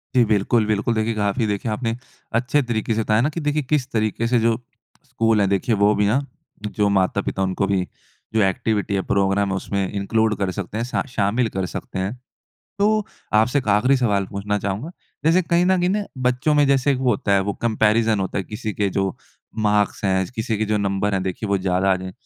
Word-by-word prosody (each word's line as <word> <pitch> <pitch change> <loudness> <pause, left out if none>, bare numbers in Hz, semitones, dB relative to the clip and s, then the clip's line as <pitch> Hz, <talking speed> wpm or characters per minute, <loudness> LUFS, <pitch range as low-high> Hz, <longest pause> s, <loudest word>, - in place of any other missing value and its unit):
जी 125 - +6
बिल्कुल, 110 +2 +2
बिल्कुल 110 +2 +1
देखिए 110 +1 0
काफ़ी 105 +2 0
देखें 105 +3 -2
आपने 115 +1 -2 0.4
अच्छे 130 +5 +2
तरीके 115 -2 -1
से 115 - 0
बताया 110 +1 +2
ना 145 - +2
कि 160 - -5
देखिए 150 0 0
किस 135 -1 0
तरीके 110 +1 0
से 120 0 +3
जो 115 0 +2 0.5
स्कूल 115 -3 +2
हैं 100 - +2
देखिए 100 +4 +1
वो 105 +1 +4
भी 105 0 +2
ना 120 +6 +3 0.5
जो 105 -1 0
माता-पिता 95 0 0
उनको 95 +1 0
भी 95 -2 0 0.5
जो 110 - +3
एक्टिविटी 100 +1 0
है, 95 - +1
प्रोग्राम 100 +1 +1
है 95 - -1
उसमें 95 0 -2
इनक्लूड 110 +2 +1
कर 95 -2 -1
सकते 100 +2 -4
हैं 115 - -1
सा 125 - -1
शामिल 110 +1 +1
कर 95 - 0
सकते 95 +2 -6
हैं। 95 +4 -2 0.7
तो 215 +1 +2 0.3
आपसे 120 +6 +3
एक 125 - -4
आखरी 120 +7 +4
सवाल 105 -6 +1
पूछना 105 +1 -2
चाहूँगा। 100 - -3 0.3
जैसे 170 +3 +4
कहीं 170 +1 +2
न 185 0 +3
कहीं 180 - +2
ना 205 +1 0 0.2
बच्चों 125 +5 +1
में 145 -1 +4
जैसे 140 0 +3
एक 130 - -1
वो 130 -2 +2
होता 100 -1 0
है 100 - +4
वो - - +1
कम्पैरिज़न 110 -1 +2
होता 95 - -2
है 95 - -2
किसी 110 0 -5
के 100 0 0
जो 95 -1 0 0.5
मार्क्स 105 0 +1
हैं 95 -1 +2
किसी 110 0 -2
के 110 - +1
जो 105 0 0
नंबर 100 0 0
हैं 95 - 0
देखिए 95 +3 -4
वो 100 -1 +2
ज़्यादा 95 +1 +1
आ - - +2
जाएँ, 95 0 -7
105 Hz, 220 wpm, -22 LUFS, 100-120 Hz, 0.7 s, जी